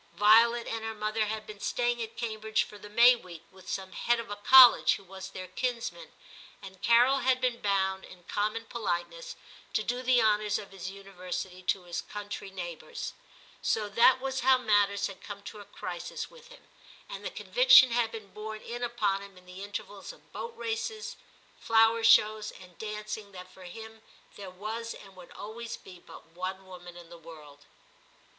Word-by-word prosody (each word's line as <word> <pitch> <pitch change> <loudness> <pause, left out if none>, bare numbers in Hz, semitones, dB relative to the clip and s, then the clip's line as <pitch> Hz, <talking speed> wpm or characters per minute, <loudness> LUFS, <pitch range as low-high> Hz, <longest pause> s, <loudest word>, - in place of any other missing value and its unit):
Violet 230 +3 +5
and 225 -1 -4
her 225 0 -4
mother 215 0 -1
had 215 0 -4
been 210 -1 -10
staying 240 +2 -1
at 225 0 -6
Cambridge 220 -2 -1
for 210 - -12
the 210 - -11
May 235 +4 +7
week 175 -7 -12
with 190 0 -14
some 190 -1 -4
Head 240 +5 +1
of 230 -2 -7
a - - -3
college 250 +4 +8
who - - -11
was 190 0 -9
their 185 -1 -8
kinsman, 250 - -4 0.5
and 190 -1 -12
Carol 245 +5 +5
had 260 -1 +2
been 250 -2 -1
bound, 190 -1 0
in 180 -1 -14
common 215 +5 -2
politeness, 235 - -4 0.4
to 215 - +1
do 245 +3 -2
the 255 -1 +4
honours 210 -2 +2
of 200 - -9
his 190 -1 -7
University 185 -1 -7
to 185 0 -1
his 175 -1 -4
country 205 -1 -7
neighbours; 180 - -7 0.5
so 215 -2 0
that 235 +5 +5
was 265 0 -3
how 260 +1 +5
matters 205 -4 +2
had 195 - -7
come 200 -1 -9
to 210 - -9
a 205 - -11
crisis 175 -3 -6
with 485 -1 -16
him, - - -17 0.4
and - - -8
the - - -3
conviction - - +6
had 230 -1 +1
been 215 -4 -9
borne 215 0 -7
in 240 +1 -6
upon 215 -5 0
him 200 -1 -13
in 180 - -17
the 180 +2 -9
intervals 205 0 -7
X - - -17
TIM - - -29
231 - - -5
of - - -24
boat - - -20
races, 235 - -4 0.4
flower 225 0 +3
shows, 215 -1 +5
and 180 -2 -15
dancing 210 -1 -6
that 185 0 -10
for 185 0 -14
him 220 +4 -10 0.3
there 195 -2 -8
was 220 +5 -5
and 195 -2 -14
would 180 -1 -13
always 225 +2 -7
be 180 -2 -14
but - - -14
one 185 +3 -6
woman 175 -1 -11
in 170 -1 -13
the 170 0 -12
world. 150 -3 -14
210 Hz, 190 wpm, -29 LUFS, 190-235 Hz, 0.5 s, college